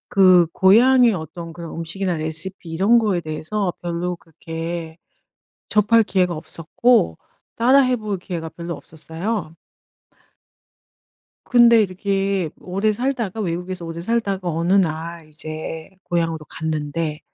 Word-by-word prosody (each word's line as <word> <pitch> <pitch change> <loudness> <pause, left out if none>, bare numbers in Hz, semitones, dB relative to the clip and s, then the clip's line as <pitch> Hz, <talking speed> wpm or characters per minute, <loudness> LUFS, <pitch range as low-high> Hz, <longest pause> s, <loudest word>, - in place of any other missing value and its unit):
그 185 -3 +6
고향의 235 +4 +5
어떤 165 0 -7
그런 170 0 -8
음식이나 175 +2 -2
레시피 160 +4 0
이런 195 +9 +4
거에 205 -6 +1
대해서 170 +5 -3
별로 175 +1 -3
그렇게 165 0 -7 0.7
접할 220 +2 +4
기회가 180 -4 0
없었고 165 - +1 0.4
따라해 255 +1 +4
볼 210 -3 -4
기회가 170 -3 -5
별로 170 +1 -6
없었어요. 160 +4 -5 1.9
근데 235 -2 +6
이렇게 195 -2 -1
오래 195 +4 0
살다가 235 -3 -2
외국에서 180 -1 -4
오래 165 0 -6
살다가 195 -4 -1
어느 170 +2 0
날 165 -2 -1
이제 155 +1 -5
고향으로 165 -2 -1
갔는데 155 0 -3
175 Hz, 275 characters per minute, -21 LUFS, 165-205 Hz, 1.9 s, 그